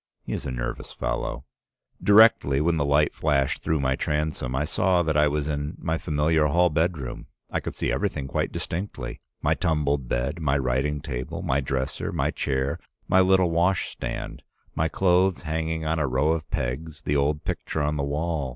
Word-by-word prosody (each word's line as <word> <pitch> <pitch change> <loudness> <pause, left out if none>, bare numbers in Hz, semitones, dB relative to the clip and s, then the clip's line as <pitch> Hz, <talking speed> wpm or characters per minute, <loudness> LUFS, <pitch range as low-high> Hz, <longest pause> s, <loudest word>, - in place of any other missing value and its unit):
He - - -5
is - - -4
a - - -3
nervous - - -4
fellow. 65 0 -3 0.6
"Directly, 105 -10 +6
when 80 +2 +2
the 70 - +1
light 75 +1 +3
flashed 70 -3 +1
through 80 -1 0
my 65 0 +1
transom, 75 -4 -2
I 70 +3 0
saw 90 +2 +2
that 80 -2 0
I 75 0 +5
was 75 0 -1
in 75 +1 -3
my 80 -1 -2
familiar 75 0 +2
hall 85 +3 +3
bedroom. 80 -4 -1 0.2
I - - 0
could - - -6
see - - -1
everything 70 - -1
quite - - -1
distinctly 75 -9 -5
— - - -54
my - - +3
tumbled 75 -5 0
bed, 70 +7 -1
my 70 -2 +2
writing 70 +3 0
table, 70 +9 -5
my 70 -5 +1
dresser, 65 0 -2
my - - 0
chair, 65 0 -1 0.3
my 95 - +4
little 95 -2 +4
wash 90 +3 +2
stand, - - -5 0.3
my 80 - +1
clothes 90 0 +2
hanging 80 0 -2
on 80 +1 0
a 75 - +1
row 65 +5 +2
of 80 -1 -2
pegs, 75 +5 -3
the 75 - 0
old 75 +1 +1
picture 80 - -2
on 75 +1 0
the 70 - -1
wall. 75 0 -1
75 Hz, 190 wpm, -25 LUFS, 70-80 Hz, 0.6 s, Directly